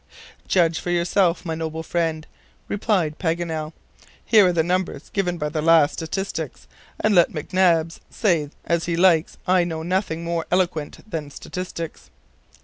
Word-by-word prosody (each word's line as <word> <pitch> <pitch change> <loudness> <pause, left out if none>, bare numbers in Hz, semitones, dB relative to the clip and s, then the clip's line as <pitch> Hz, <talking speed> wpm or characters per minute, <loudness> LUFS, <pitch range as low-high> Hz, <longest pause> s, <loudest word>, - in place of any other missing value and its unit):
"Judge 170 -3 +2
for - - -5
yourself, 175 +1 +1
my 165 - -2
noble 160 0 -4
friend," 160 -2 -1 0.4
replied 190 -7 0
Paganel. 165 -3 -2 0.5
"Here 210 -4 +6
are - - +3
the 165 -2 +2
numbers 180 +2 -2
given 180 -4 -1
by 150 -2 -2
the 155 0 -2
last 160 -2 +5
statistics; 190 +4 -4 0.3
and 215 - +2
let 175 -3 +5
McNabbs 165 0 +1
say 170 -9 +1 0.2
as 170 -1 0
he 170 -1 -1
likes, 170 -3 +3
I 180 -1 +4
know 160 -2 -4
nothing 175 -2 -1
more 170 -1 -2
eloquent 175 0 -1
than 160 -7 -4
statistics." 170 +1 -7
170 Hz, 145 wpm, -23 LUFS, 160-180 Hz, 0.5 s, Here